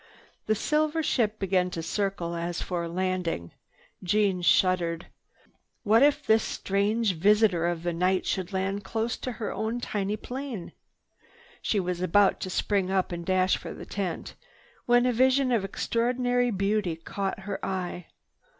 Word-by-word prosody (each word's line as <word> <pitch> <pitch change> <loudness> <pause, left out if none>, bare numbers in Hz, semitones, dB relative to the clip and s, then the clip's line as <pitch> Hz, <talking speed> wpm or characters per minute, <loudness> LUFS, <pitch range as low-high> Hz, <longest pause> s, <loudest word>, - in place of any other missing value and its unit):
The 215 - +3
silver 305 +6 +1
ship 220 -7 +1
began 185 -2 +1
to 165 -2 -5
circle 195 -2 -2
as 170 0 -3
for 175 -2 -3
a - - -5
landing. 180 - -2 0.5
Jeanne 195 0 +1
shuddered. 175 -2 +2 0.8
What 225 +1 +5
if 290 +1 +4
this 220 0 +4
strange 205 +2 0
visitor 195 -1 +3
of 170 -1 -2
the 175 0 -1
night 185 +2 +1
should 190 -1 -2
land 195 +1 -2
close 225 +3 -2
to 255 - -4
her 220 -1 -4
own 225 +2 -2
tiny 205 -3 -2
plane! 250 -5 -6 0.9
She 210 - +1
was 180 -1 -2
about 195 +2 +3
to 185 - -4
spring 195 0 0
up 190 -1 0
and 170 0 -4
dash 185 +1 +2
for - - -8
the - - -9
tent, 190 -4 -4 0.5
when 245 0 +5
a 250 - +2
vision 260 +2 +3
of 230 -5 +2
extraordinary 245 +4 0
beauty 200 -3 0
caught 195 +4 -4
her 195 0 -5
eye. 180 -2 -3
195 Hz, 155 wpm, -27 LUFS, 180-225 Hz, 0.9 s, What